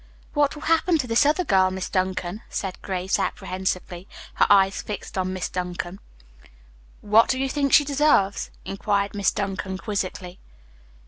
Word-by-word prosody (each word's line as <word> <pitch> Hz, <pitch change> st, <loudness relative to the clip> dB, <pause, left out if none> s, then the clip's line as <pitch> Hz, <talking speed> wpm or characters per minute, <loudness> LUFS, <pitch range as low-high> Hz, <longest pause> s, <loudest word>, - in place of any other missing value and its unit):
"What 290 Hz, -1 st, +2 dB
will 300 Hz, -, -10 dB
happen 330 Hz, +1 st, +3 dB
to 285 Hz, -, -2 dB
this 240 Hz, +4 st, +3 dB
other 310 Hz, +5 st, +2 dB
girl, 190 Hz, -, +3 dB
Miss 185 Hz, 0 st, -4 dB
Duncan?" 185 Hz, +1 st, -2 dB
asked 190 Hz, -2 st, -4 dB
Grace 190 Hz, 0 st, -1 dB
apprehensively, 185 Hz, -1 st, -3 dB, 0.3 s
her -, -, +3 dB
eyes 195 Hz, -1 st, +4 dB
fixed 205 Hz, -2 st, -7 dB
on 185 Hz, -1 st, -1 dB
Miss 185 Hz, -1 st, -3 dB
Duncan. 180 Hz, +1 st, -5 dB, 1.0 s
"What 215 Hz, +2 st, +4 dB
do 260 Hz, -, +1 dB
you 270 Hz, -, 0 dB
think 280 Hz, 0 st, 0 dB
she 290 Hz, -, +6 dB
deserves?" 280 Hz, -9 st, +2 dB, 0.2 s
inquired 200 Hz, 0 st, -1 dB
Miss 200 Hz, -1 st, +2 dB
Duncan 195 Hz, -2 st, -3 dB
quizzically. 190 Hz, -3 st, -4 dB
195 Hz, 150 wpm, -24 LUFS, 185-250 Hz, 1.0 s, she